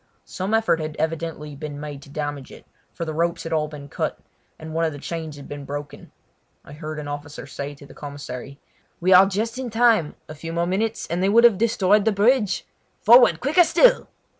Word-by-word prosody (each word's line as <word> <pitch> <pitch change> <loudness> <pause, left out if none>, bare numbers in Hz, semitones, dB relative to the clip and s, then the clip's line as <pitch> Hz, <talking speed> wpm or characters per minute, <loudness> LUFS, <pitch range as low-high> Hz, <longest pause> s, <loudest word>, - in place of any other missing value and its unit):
Some 195 +4 -2
effort 225 -7 +2
had 155 -1 -5
evidently 160 -2 -3
been 145 0 -7
made 145 -2 -7
to 140 - -15
damage 145 -2 -5
it, - - -14 0.3
for 170 - -5
the 155 - -4
ropes 170 +2 -1
had 165 - -4
all 155 -1 +1
been 150 -2 -10
cut, - - -3 0.4
and 160 0 -9
one 165 +1 0
of 160 -2 0
the - - -8
chains 160 0 -6
had 140 -1 -11
been 145 -1 -7
broken. 145 +1 -7 0.5
I 140 - -12
heard 155 0 -7
the 150 - -5
officer 145 0 -7
say 140 +1 -6
to 140 - -14
the - - -14
commissary: 140 -1 -8 0.4
"We 185 +2 +4
are 185 +2 +8
just 225 +5 -2
in 255 -2 -4
time! 225 -8 +3
A - - -8
few 165 +2 -7
more 170 0 0
minutes, 215 +5 -1
and 170 +2 -2
they 190 - +2
would 230 +3 +5
have 230 -5 +6
destroyed 210 -2 +3
the 220 - +4
bridge. 210 +1 +2 0.4
Forward, 230 -7 +7
quicker 310 +7 +5
still!" - - +4
165 Hz, 215 wpm, -23 LUFS, 145-205 Hz, 0.5 s, are